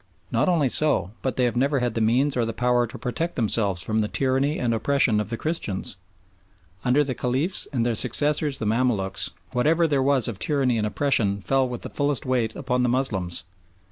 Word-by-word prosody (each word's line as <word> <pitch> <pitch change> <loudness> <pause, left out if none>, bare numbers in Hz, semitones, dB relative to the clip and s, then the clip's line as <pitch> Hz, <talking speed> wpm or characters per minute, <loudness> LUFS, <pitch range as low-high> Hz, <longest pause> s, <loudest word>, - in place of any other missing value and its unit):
Not - - +2
only 160 -6 +2
so, 135 - +1
but 130 - -2
they 130 - +1
have 120 - -1
never 140 +3 +1
had 125 -3 0
the 115 - -1
means 130 +6 +2
or 120 - +1
the 115 0 -2
power 125 0 +2
to 115 - -9
protect 165 +7 -3
themselves 100 -6 0
from 110 +3 -1
the 105 - +1
tyranny 135 +5 0
and 120 -2 0
oppression 115 -1 +2
of 105 - -3
the 115 - -3
Christians. 155 - -3 0.9
Under 130 +4 +3
the 135 -2 -2
Caliphs 130 +10 -1
and 120 -5 0
their 120 - +1
successors 145 +4 +1
the 110 - -4
Mamaluks 105 -4 0 0.2
whatever 160 +7 +2
there 140 -3 +1
was 135 -2 +2
of 115 -5 -5
tyranny 135 -6 +1
and 105 - 0
oppression 110 -5 +1
fell 130 +5 +1
with 120 -2 -6
fullest 145 -2 0
weight 120 -4 0
upon 125 0 -1
the 125 - +2
Moslems. 100 -9 0
125 Hz, 200 wpm, -24 LUFS, 115-140 Hz, 0.9 s, Under